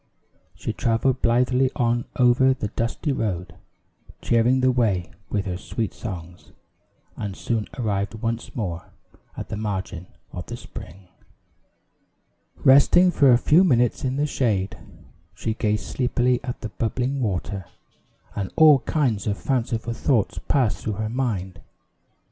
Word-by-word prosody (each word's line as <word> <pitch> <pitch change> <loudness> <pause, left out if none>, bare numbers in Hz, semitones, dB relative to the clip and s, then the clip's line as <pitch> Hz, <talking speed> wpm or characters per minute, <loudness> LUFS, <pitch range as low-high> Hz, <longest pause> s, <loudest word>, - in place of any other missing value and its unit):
She - - -4
traveled 120 +2 0
blithely 125 +2 +3
on 120 0 +1
over 125 +2 +4
the 105 -5 -4
dusty 115 +8 -2
road, 90 -9 -2 0.7
cheering 120 +3 +2
the 130 0 +4
way 105 -9 0 0.2
with 100 -2 -1
her 90 -2 -3
sweet 110 +1 -3
songs, 90 -4 -8 0.6
and 100 -2 -5
soon 115 -3 -2
arrived 100 -3 -1
once 115 +1 -4
more 90 -7 -4 0.4
at - - -6
the 105 - -4
margin 95 -4 -4 0.2
of 90 -3 -7
the - - -6
spring. 90 +3 -11 1.6
Resting 145 +7 +6
for 140 -6 +5
a 120 - +7
few 155 +8 +4
minutes 125 - +2
in 130 0 -1
the 145 +2 +1
shade, 110 -9 0 0.6
she 110 +4 -2
gazed 105 -1 -1
sleepily 125 -1 +1
at 125 - -5
the 110 - -4
bubbling 125 +5 -2
water, 100 -3 -2 0.7
and 100 -2 -3
all 155 -3 +7
kinds 125 -10 0
of 100 -1 0
fanciful 115 -3 -1
thoughts 115 - 0
passed 130 -6 +2
through 110 - -3
her 110 +2 -3
mind. 110 -7 -3
115 Hz, 135 wpm, -24 LUFS, 100-130 Hz, 1.6 s, a